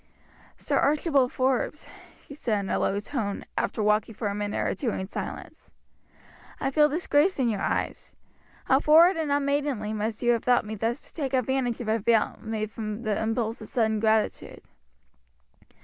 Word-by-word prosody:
"Sir -, -, -1 dB
Archibald 280 Hz, -3 st, +2 dB
Forbes," 260 Hz, +3 st, -1 dB, 0.3 s
she -, -, -13 dB
said 225 Hz, -8 st, -1 dB
in 195 Hz, -, -4 dB
a -, -, +1 dB
low 200 Hz, -, 0 dB
tone, 210 Hz, -2 st, -4 dB
after 215 Hz, -, -1 dB
walking 210 Hz, +1 st, +1 dB
for 215 Hz, -1 st, -2 dB
a -, -, -3 dB
minute 205 Hz, 0 st, -3 dB
or -, -, 0 dB
two 255 Hz, -, -2 dB
in 190 Hz, -3 st, -3 dB
silence, -, -, -7 dB, 0.9 s
"I 270 Hz, -, -1 dB
feel 300 Hz, +2 st, +4 dB
disgraced 315 Hz, +2 st, +1 dB
in 250 Hz, -3 st, +2 dB
your 210 Hz, -3 st, -2 dB
eyes. -, -, -2 dB, 0.5 s
How 265 Hz, -, +4 dB
forward 330 Hz, +5 st, +6 dB
and 315 Hz, -3 st, -2 dB
unmaidenly 280 Hz, -6 st, 0 dB
must 215 Hz, +2 st, -3 dB
you 240 Hz, -, +4 dB
have 235 Hz, -2 st, 0 dB
thought 250 Hz, -3 st, +3 dB
me 215 Hz, -, -5 dB
thus 225 Hz, +5 st, -2 dB
to -, -, -19 dB
take 275 Hz, -4 st, -2 dB
advantage 255 Hz, -1 st, 0 dB
of 235 Hz, -, -6 dB
a 220 Hz, +1 st, +1 dB
vow 225 Hz, +1 st, +2 dB
made 220 Hz, -1 st, -3 dB
from 215 Hz, +1 st, -5 dB
the 215 Hz, -2 st, -1 dB
impulse 225 Hz, +1 st, -2 dB
of 215 Hz, -, -8 dB
sudden 220 Hz, -3 st, 0 dB
gratitude." 220 Hz, 0 st, 0 dB
235 Hz, 180 wpm, -26 LUFS, 215-275 Hz, 0.9 s, forward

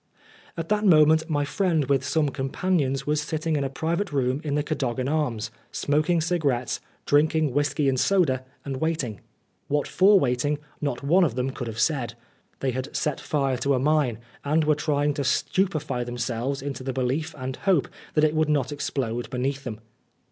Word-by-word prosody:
At 165 Hz, -1 st, -4 dB
that 210 Hz, 0 st, +2 dB
moment 160 Hz, -4 st, +5 dB
my 145 Hz, -2 st, +1 dB
friend 165 Hz, -2 st, +1 dB
with 135 Hz, 0 st, +1 dB
some 150 Hz, +1 st, +1 dB
companions 135 Hz, 0 st, -1 dB
was 150 Hz, 0 st, +1 dB
sitting 155 Hz, +1 st, -2 dB
in 145 Hz, -, 0 dB
a 135 Hz, -, -1 dB
private 170 Hz, +7 st, -2 dB
room 135 Hz, 0 st, 0 dB
in 145 Hz, -2 st, -1 dB
the 150 Hz, -, +1 dB
Cadogan 130 Hz, -4 st, -2 dB
Arms, 125 Hz, -7 st, -1 dB, 0.2 s
smoking 155 Hz, +4 st, +1 dB
cigarettes, 150 Hz, -8 st, 0 dB, 0.3 s
drinking 155 Hz, -1 st, +3 dB
whisky 145 Hz, 0 st, +1 dB
and 130 Hz, -1 st, +2 dB
soda, 150 Hz, -10 st, +2 dB, 0.2 s
and 135 Hz, -2 st, -3 dB
waiting. 140 Hz, -, -2 dB, 0.5 s
What 145 Hz, 0 st, 0 dB
for 195 Hz, +1 st, +5 dB
waiting, 140 Hz, +1 st, +1 dB, 0.2 s
not 140 Hz, -3 st, -2 dB
one 175 Hz, +7 st, +4 dB
of 145 Hz, -9 st, +1 dB
them 130 Hz, +1 st, -1 dB
could 125 Hz, -2 st, -5 dB
have 110 Hz, -1 st, -6 dB
said. 120 Hz, -2 st, 0 dB, 0.5 s
They 135 Hz, -, +1 dB
had 130 Hz, +2 st, -5 dB
set 150 Hz, -2 st, -1 dB
fire 135 Hz, -4 st, 0 dB
to 140 Hz, +3 st, +1 dB
a -, -, +1 dB
mine, 145 Hz, -4 st, +2 dB, 0.3 s
and 155 Hz, +3 st, +2 dB
were 155 Hz, 0 st, +4 dB
trying 145 Hz, -1 st, 0 dB
to 140 Hz, -, -2 dB
stupefy 155 Hz, -3 st, 0 dB
themselves 120 Hz, +3 st, -3 dB
into 135 Hz, -2 st, -4 dB
the 130 Hz, 0 st, -3 dB
belief 130 Hz, +5 st, -1 dB
and 130 Hz, -1 st, -4 dB
hope 190 Hz, -8 st, +2 dB, 0.3 s
that 150 Hz, -, +4 dB
it 155 Hz, 0 st, +4 dB
would 155 Hz, -1 st, +1 dB
not 145 Hz, -2 st, +1 dB
explode 120 Hz, -5 st, -3 dB
beneath 135 Hz, +2 st, -2 dB
them. 110 Hz, -4 st, -5 dB
145 Hz, 180 wpm, -25 LUFS, 130-155 Hz, 0.5 s, moment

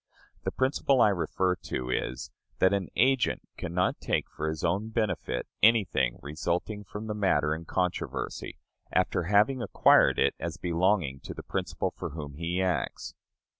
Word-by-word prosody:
The -, -, 0 dB
principle 135 Hz, 0 st, +2 dB
I 105 Hz, -, +6 dB
refer 95 Hz, -1 st, 0 dB
to 65 Hz, 0 st, -4 dB
is, 65 Hz, -, -3 dB, 0.3 s
that 95 Hz, +1 st, +4 dB
an 100 Hz, -2 st, 0 dB
agent 130 Hz, 0 st, +2 dB
can -, -, -5 dB
not 90 Hz, +1 st, +1 dB
take -, -, 0 dB
for 80 Hz, +1 st, -3 dB
his 80 Hz, -1 st, -4 dB
own 95 Hz, +6 st, 0 dB
benefit 110 Hz, -, -1 dB, 0.2 s
anything 100 Hz, -, +3 dB
resulting 85 Hz, +7 st, -2 dB
from 105 Hz, +2 st, -7 dB
the 110 Hz, -, -3 dB
matter 80 Hz, -8 st, +2 dB
in 80 Hz, +1 st, -6 dB
controversy, 90 Hz, +1 st, -3 dB, 0.3 s
after 85 Hz, -, +1 dB
having 105 Hz, +7 st, +3 dB
acquired 115 Hz, -, +5 dB
it -, -, +3 dB
as -, -, -4 dB
belonging 85 Hz, -5 st, +1 dB
to -, -, -8 dB
the -, -, -8 dB
principal -, -, -2 dB
for -, -, -6 dB
whom 75 Hz, -3 st, -6 dB
he 85 Hz, +5 st, -1 dB
acts. 90 Hz, -3 st, -2 dB
90 Hz, 160 wpm, -28 LUFS, 80-105 Hz, 0.3 s, I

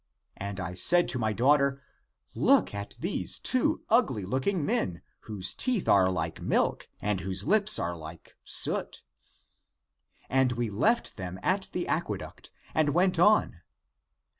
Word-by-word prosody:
And 100 Hz, 0 st, -6 dB
I 90 Hz, -1 st, -5 dB
said 175 Hz, -, +5 dB
to 125 Hz, -, 0 dB
my 110 Hz, -1 st, -1 dB
daughter, 140 Hz, +4 st, +2 dB, 0.5 s
Look -, -, +2 dB
at 100 Hz, 0 st, -6 dB
these 180 Hz, +5 st, -2 dB
two 255 Hz, -1 st, 0 dB
ugly 215 Hz, -, +1 dB
looking 140 Hz, -, -2 dB
men, 90 Hz, -9 st, -2 dB, 0.3 s
whose 100 Hz, -3 st, -1 dB
teeth 250 Hz, -7 st, 0 dB
are 95 Hz, -2 st, +4 dB
like 80 Hz, -3 st, -4 dB
milk -, -, -1 dB
and 105 Hz, -2 st, -2 dB
whose 95 Hz, 0 st, -3 dB
lips 215 Hz, +4 st, +5 dB
are 85 Hz, +1 st, -3 dB
like 80 Hz, 0 st, -12 dB
soot. -, -, +1 dB, 1.2 s
And 130 Hz, -1 st, +1 dB
we 120 Hz, -2 st, -3 dB
left 220 Hz, -, 0 dB
them 90 Hz, -1 st, -7 dB
at -, -, -1 dB
the -, -, -4 dB
aqueduct -, -, -4 dB, 0.2 s
and 155 Hz, -2 st, 0 dB
went 180 Hz, -1 st, +2 dB
on. 210 Hz, +4 st, +3 dB
120 Hz, 140 wpm, -27 LUFS, -, 1.2 s, said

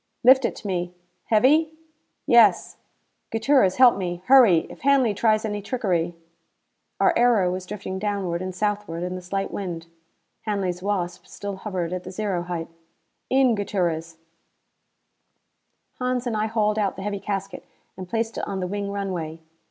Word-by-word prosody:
"Lift 260 Hz, +1 st, +7 dB
it -, -, -1 dB
to -, -, -12 dB
me. 180 Hz, -2 st, -3 dB, 0.3 s
Heavy?" 300 Hz, +8 st, +3 dB, 0.5 s
"Yes." 235 Hz, -8 st, +4 dB, 0.5 s
"Gutierrez, 225 Hz, -4 st, +3 dB
help 250 Hz, -4 st, +6 dB
me. 175 Hz, -2 st, -4 dB
Hurry! 235 Hz, -11 st, +6 dB
If -, -, -13 dB
Hanley 270 Hz, -5 st, +3 dB
tries 215 Hz, +1 st, +2 dB
any 205 Hz, -1 st, -3 dB
trickery 185 Hz, -7 st, -1 dB, 0.4 s
" -, -, -51 dB
Our -, -, +4 dB
aero 230 Hz, -7 st, +3 dB
was 185 Hz, 0 st, -5 dB
drifting 190 Hz, -1 st, -5 dB
downward 195 Hz, -4 st, -2 dB
and 185 Hz, -1 st, -5 dB
southward 205 Hz, -4 st, -2 dB
in 180 Hz, 0 st, -3 dB
the 185 Hz, -, -6 dB
slight 195 Hz, +2 st, -3 dB
wind. 175 Hz, -4 st, -5 dB, 0.6 s
Hanley's 190 Hz, -4 st, -2 dB
Wasp 185 Hz, -3 st, -3 dB
still 200 Hz, -1 st, -6 dB
hovered 185 Hz, -4 st, -4 dB
at 180 Hz, 0 st, -4 dB
the -, -, -8 dB
zero 195 Hz, -2 st, -2 dB
height. 175 Hz, -2 st, -4 dB, 0.6 s
"In, 260 Hz, -2 st, +4 dB
Gutierrez." 170 Hz, -6 st, -2 dB, 1.8 s
Hans 250 Hz, 0 st, -1 dB
and 240 Hz, -3 st, -2 dB
I 215 Hz, +1 st, 0 dB
hauled 215 Hz, -1 st, 0 dB
out 200 Hz, -2 st, 0 dB
the 190 Hz, -, -7 dB
heavy 205 Hz, -1 st, -3 dB
casket 195 Hz, -1 st, -4 dB, 0.3 s
and 185 Hz, -1 st, -8 dB
placed 225 Hz, +1 st, -2 dB
it -, -, -4 dB
on 195 Hz, -, -3 dB
the 185 Hz, -, -2 dB
wing 200 Hz, +2 st, -3 dB
runway. 180 Hz, -5 st, -4 dB
200 Hz, 160 wpm, -24 LUFS, 180-220 Hz, 1.8 s, Lift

